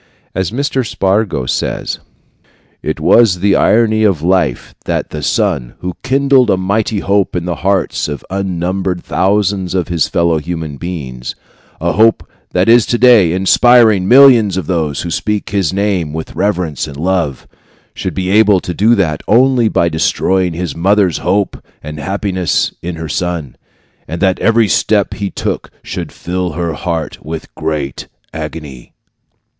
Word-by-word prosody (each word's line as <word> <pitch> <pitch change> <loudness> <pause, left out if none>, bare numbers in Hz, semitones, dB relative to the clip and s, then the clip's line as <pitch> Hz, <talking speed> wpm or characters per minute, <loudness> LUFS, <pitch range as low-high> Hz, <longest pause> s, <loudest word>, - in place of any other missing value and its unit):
As 95 -2 -1
Mr. 135 +2 -1
Spargo 100 - 0
says: - - -2 0.8
It - - -3
was 110 -7 +4
the 100 +1 +2
irony 110 -1 +3
of 95 -8 +1
life 90 +1 0
that - - -2
the 75 - -5
son, 80 - -1
who 90 0 -4
kindled 135 -2 +3
a 95 - +3
mighty 100 +2 -1
hope 100 -1 0
in 90 -1 -2
the 85 -2 -3
hearts 95 0 0
of 75 -3 -6
unnumbered 95 -1 -2
thousands 95 -1 0
of 90 -1 -1
his 85 -3 +1
fellow 85 -2 +1
human 80 -2 -5
beings, 65 -8 -6 0.4
a - - 0
hope 110 +2 +3 0.2
that 90 +1 +1
is 115 -1 +5
today 120 -7 +5
inspiring 105 +2 +4
millions 120 -6 +6
of 95 - -2
those 80 -4 -2
who 85 - -5
speak 105 +3 -2
his 95 -5 0
name 95 -6 -1
with 80 0 -6
reverence 90 -9 -1
and 70 -2 -9
love, 85 -5 -1 0.5
should - - -5
be 95 0 -2
able 105 -2 +5
to 90 - -5
do 110 +6 +3
that 80 -7 0
only 125 0 +4
by 85 - +1
destroying 90 +2 0
his 85 -3 -4
mother's 95 0 +2
hope 100 0 -1 0.2
and 75 +1 -7
happiness 95 +2 -1
in 85 0 -5
her 80 0 -6
son, 80 -3 -3 0.5
and 80 +3 -5
that 95 0 +1
every 115 -1 +3
step - - +1
he 100 -1 -3
took - - -4
should - - -6
fill 90 0 -4
her 85 0 -2
heart 80 +1 -4
with 80 +1 -5
a - - -15
great 75 -4 -3 0.3
agony. 75 -5 -8
95 Hz, 155 wpm, -14 LUFS, 80-105 Hz, 0.8 s, millions